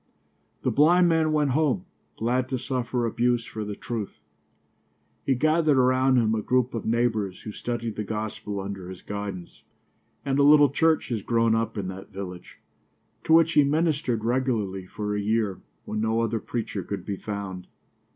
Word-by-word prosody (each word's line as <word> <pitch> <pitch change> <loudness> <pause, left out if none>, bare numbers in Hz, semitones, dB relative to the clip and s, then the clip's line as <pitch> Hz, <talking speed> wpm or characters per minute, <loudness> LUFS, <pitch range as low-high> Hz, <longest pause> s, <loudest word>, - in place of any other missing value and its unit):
The - - +1
blind 175 +5 +5
man 160 -1 +2
went 150 -3 +2
home, 135 - +1 0.3
glad 125 +3 0
to 130 - -1
suffer 125 -1 -2
abuse 120 +1 +1
for 110 - -6
the 105 0 -5
truth. 115 -3 -5 1.1
He 135 - +3
gathered 155 +1 +3
around 130 0 +4
him 110 -2 +3
a 110 - 0
group 125 +2 +1
of 115 - -4
neighbors 110 -5 0
who 110 - -7
studied 115 0 -4
the 105 - -1
gospel 105 -1 -4
under 95 -2 -6
his 95 -1 -10
guidance, 100 -4 -6 0.6
and 135 0 +1
a - - +5
little 145 -1 +7
church 160 0 +2
has 115 -4 -2
grown 115 +1 +2
up 115 0 -1
in 100 -2 -2
that 95 +1 -9
village, 90 -2 -8 0.7
to 160 - +3
which 165 0 +5
he 150 - +6
ministered 145 -5 0
regularly 115 -7 -1
for 105 +2 -3
a 105 - -1
year, 105 -2 0 0.2
when 105 - -3
no 110 +1 +1
other 115 0 0
preacher 110 -3 -4
could 100 +2 -6
be 100 -2 -3
found. 100 -3 -6
115 Hz, 170 wpm, -26 LUFS, 105-130 Hz, 1.1 s, little